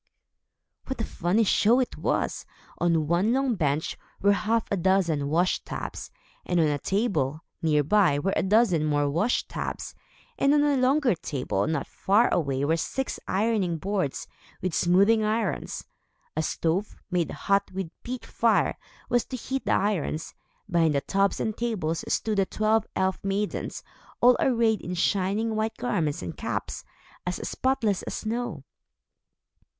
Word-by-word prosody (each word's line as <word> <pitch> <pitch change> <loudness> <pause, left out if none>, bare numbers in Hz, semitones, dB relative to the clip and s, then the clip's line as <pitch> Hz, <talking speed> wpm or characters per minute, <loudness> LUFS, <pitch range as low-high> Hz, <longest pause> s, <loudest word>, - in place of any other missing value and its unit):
What 265 - -4
a - - 0
funny 190 +3 +1
show 220 +4 +4
it 255 - -1
was! - - -1 0.4
On 165 -3 +2
one 175 +8 +2
long 265 -1 +1
bench, 150 -5 -1 0.2
were 200 - +4
half 220 +2 +1
a - - +3
dozen 170 -6 +2
washtubs; 175 +4 -1 0.3
and 175 -1 0
on 160 - +4
a 145 -1 0
table, 160 - 0 0.2
near 150 -3 +3
by, 180 -2 +3
were 195 +7 0
a - - +2
dozen 190 -5 +3
more 145 -1 +1
washtubs; 170 +12 -2 0.5
and 280 +2 +4
on 290 - +4
a 290 -1 +3
longer 265 0 +3
table 130 - -2
not 155 -3 -1
far 210 +5 +2
away 140 -4 0
were 160 +3 +2
six 265 +10 -3
ironing 195 -4 +1
boards, 190 -4 -2 0.3
with 185 -2 -2
smoothing 200 +7 +4
irons. 215 -1 -1 0.5
A 155 - +1
stove, 170 +5 -1 0.2
made 175 -2 +1
hot 200 0 0
with 190 0 -3
a 165 - -15
peat 250 0 -6
fire, 230 -1 +1 0.3
was 245 -1 +2
to 255 - -5
heat 265 +2 -4
the - - +3
irons. 185 -6 -1 0.3
Behind 165 -4 +2
the 140 - +2
tubs 195 +4 +1
and 220 -1 -1
tables, 185 -9 -2
stood 215 -2 0
the 195 - +2
twelve 215 0 +1
elf 190 0 0
maidens, 195 +1 -2 0.4
all 245 +1 +6
arrayed 230 -4 +2
in 180 - -4
shining 200 +5 0
white 220 +1 -1
garments 180 - -1
and 85 -2 -5
caps, - - -4 0.4
as 180 0 -2
spotless 250 -7 0
as - - -5
snow. 220 - -3
195 Hz, 155 wpm, -26 LUFS, 165-225 Hz, 0.5 s, all